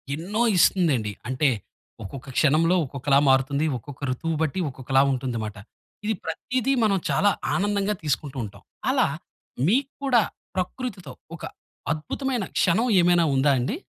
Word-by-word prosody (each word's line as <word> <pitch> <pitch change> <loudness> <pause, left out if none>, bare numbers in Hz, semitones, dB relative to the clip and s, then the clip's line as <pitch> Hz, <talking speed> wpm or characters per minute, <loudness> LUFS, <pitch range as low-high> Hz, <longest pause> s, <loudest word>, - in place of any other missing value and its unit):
ఎన్నో 200 +8 -2 0.2
ఇస్తుందండి. 150 - +3 0.2
అంటే 130 +3 +2 0.5
ఒక్కొక్క 130 +7 -8
క్షణంలో 160 +4 +4
ఒక్కొక్కలా 140 +1 +2
మారుతుంది. 135 +3 +2
ఒక్కొక్క 140 +4 -11
ఋతువు 160 +5 -2
బట్టి 160 +3 0
ఒక్కొక్కలా 135 +1 +1
ఉంటుంది 125 -2 -2
మాట. 105 -1 -6 0.5
ఇది 220 - +1
ప్రతీదీ, 250 +10 -1
మనం 200 -2 +3
చాలా 205 - +3 0.3
ఆనందంగా 205 +1 0
తీసుకుంటూ 140 -1 -2
ఉంటాం. 105 - -10 0.3
అలా - - +3 0.6
మీకు 270 +7 +2 0.2
కూడా 245 -5 +4 0.3
ప్రకృతితో 190 +2 -4 0.2
ఒక - - -13 0.5
అద్భుతమైన 240 - -3 0.2
క్షణం 205 +8 +3
ఏమైనా 175 0 +4
ఉందా 140 +2 +4
అండి? 130 - -1
160 Hz, 130 wpm, -25 LUFS, 135-205 Hz, 0.6 s, క్షణంలో